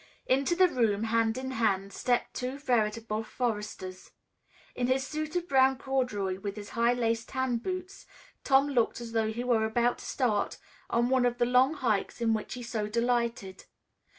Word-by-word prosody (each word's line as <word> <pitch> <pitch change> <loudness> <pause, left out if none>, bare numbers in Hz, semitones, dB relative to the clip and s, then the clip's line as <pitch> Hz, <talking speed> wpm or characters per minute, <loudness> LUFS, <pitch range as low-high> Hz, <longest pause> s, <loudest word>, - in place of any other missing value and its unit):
Into 275 +6 +2
the 370 +1 +6
room, 225 - +1
hand 225 0 +1
in 260 0 -4
hand, 200 -5 0
stepped 245 -1 0
two 255 +2 -4
veritable 225 -4 0
foresters. 210 -6 -4 0.6
In 245 - -1
his 260 +1 +1
suit 310 +3 -4
of 350 0 -1
brown 265 -2 +4
corduroy, 210 -9 -1
with 200 0 -5
his 205 -1 -8
high 235 +1 +2
laced 230 -2 -1
tan 260 -2 0
boots, 370 +8 -6 0.4
Tom 275 +1 +4
looked 240 -5 +1
as 235 -1 -7
though 220 -1 +1
he 235 +2 -4
were 240 -3 +2
about 235 +2 +1
to - - -10
start 230 -6 0 0.3
on 235 +1 +2
one 260 -1 +3
of 240 0 -2
the 240 - +2
long 255 +5 +4
hikes 230 -8 -1
in 230 -1 +2
which 215 +2 -3
he 250 - -7
so 220 -3 -2
delighted. 235 -3 -1
240 Hz, 180 wpm, -29 LUFS, 220-260 Hz, 0.6 s, the